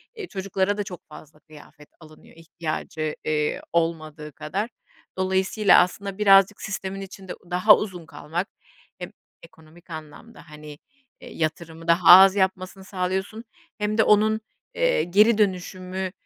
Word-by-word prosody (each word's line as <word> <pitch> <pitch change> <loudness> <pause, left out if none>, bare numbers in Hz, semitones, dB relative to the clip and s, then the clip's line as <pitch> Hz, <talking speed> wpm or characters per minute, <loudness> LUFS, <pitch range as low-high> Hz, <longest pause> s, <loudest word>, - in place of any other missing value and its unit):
eee, 425 -5 -7
çocuklara 195 - -2
da 205 - -2
çok 180 -3 -10
fazla 150 0 -14
kıyafet 150 -1 -17
alınıyor 155 -1 -17
ihtiyacı, 155 -2 -5
eee, 150 -1 -1
olmadığı 155 -2 -2
kadar. 190 - -4 0.5
Dolayısıyla 190 +1 +3
aslında 195 +2 -2
birazcık 195 -1 +4
sistemin 195 -1 -5
içinde 195 -1 -9 0.2
daha 180 +4 +6
uzun 180 -5 -6
kalmak 165 +5 -5 0.5
hem - - -7 0.3
ekonomik 165 +1 -19
anlamda, 160 +5 -11
hani, 150 -1 -11 0.4
eee, 245 - -11
yatırımı 165 +1 -4
daha 170 +1 +3
az 190 +2 +9
yapmasını 190 0 -2
sağlıyorsun 190 +3 -4 0.3
hem 210 0 -2
de 220 - +5
onun, 215 +1 +3 0.3
eee, - - +1
geri 210 +5 +3
dönüşümü 185 -2 -2
185 Hz, 130 wpm, -23 LUFS, 160-200 Hz, 0.5 s, az